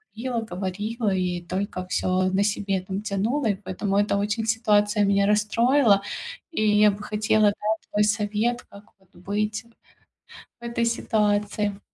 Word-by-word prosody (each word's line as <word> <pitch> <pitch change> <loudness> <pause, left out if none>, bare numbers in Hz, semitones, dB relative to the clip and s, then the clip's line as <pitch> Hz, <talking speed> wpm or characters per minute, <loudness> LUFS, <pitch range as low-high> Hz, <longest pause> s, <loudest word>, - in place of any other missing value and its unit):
говорила 235 0 -2
говорила 205 +4 -2
и 180 -1 -1
только 185 +1 -4
всё 185 0 0
на 200 +1 +3
себе, 200 -2 -1
там, 190 +2 -5
тянула, 220 +6 -1
и - - -2
поэтому 195 +1 -3
это 205 -1 +2
очень 210 +2 -1
ситуация 210 -2 +2
меня 200 0 +3
расстроила. 215 +1 +3 0.5
И 215 - -1 0.2
я 210 -1 +6
бы 205 +1 -8
хотела, 215 0 +1
да, 210 +1 -5 0.2
твой 210 0 +2
совет, 215 +3 0
как 200 +1 -13 0.2
вот 190 -1 -29
быть 210 +4 -2 1.0
в - - -15
этой 235 0 -1
ситуации. 210 -2 0
205 Hz, 145 wpm, -24 LUFS, 195-220 Hz, 1.0 s, я